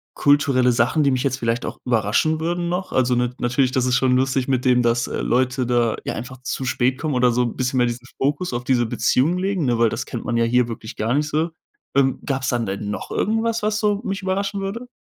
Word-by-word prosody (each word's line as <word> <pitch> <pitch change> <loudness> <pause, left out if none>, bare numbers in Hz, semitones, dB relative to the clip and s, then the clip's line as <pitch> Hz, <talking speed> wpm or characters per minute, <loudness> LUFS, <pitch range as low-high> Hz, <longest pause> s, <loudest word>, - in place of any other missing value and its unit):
kulturelle 140 -3 +3
Sachen, 120 +6 +2
die 140 - +3
mich 130 -1 0
jetzt 130 -2 0
vielleicht 115 0 -1
auch - - -5
überraschen 120 +7 +1
würden 175 +2 -1
noch? 180 +2 -3
Also, 125 -1 +2
n 125 0 0
natürlich, 125 +2 +1
das 130 -1 +1
ist 125 -1 +2
schon 125 0 +3
lustig 130 0 0
mit 130 -2 0
dem, 125 -1 +4
dass, 120 0 +1
äh, - - -3
Leute 130 0 +1
da 120 -2 +1
ja - - -3
einfach 125 +3 -7
zu 130 +1 -4
spät 130 +1 +1
kommen 155 +1 -2
oder 125 -1 +3
so 125 +1 +1
'n 120 - -3
bisschen 130 0 -1
mehr 125 - +4
diesen 120 +1 -5
Fokus 145 +4 -1
auf 120 0 -2
diese 120 -2 +1
Beziehung 145 +9 +1
legen, 190 -3 -1
ne, 120 -2 +1
weil 115 -1 +3
das 115 +2 -4
kennt 120 - -6
man 120 - -1
ja 115 0 +3
hier 125 +1 +2
wirklich 110 -1 -7
gar 115 +3 -1
nicht 150 +2 +1
so. 160 +3 0 0.4
Ähm, 135 -1 +2
gab's 135 -2 -1
dann 120 -2 0
denn 100 +1 -4
noch 105 - -5
irgendwas, 225 +1 0
was 210 0 0
so 210 -1 +1
mich 195 -3 -3
überraschen 195 +1 -1
würde? 215 +6 -5
130 Hz, 245 wpm, -21 LUFS, 120-155 Hz, 0.4 s, dem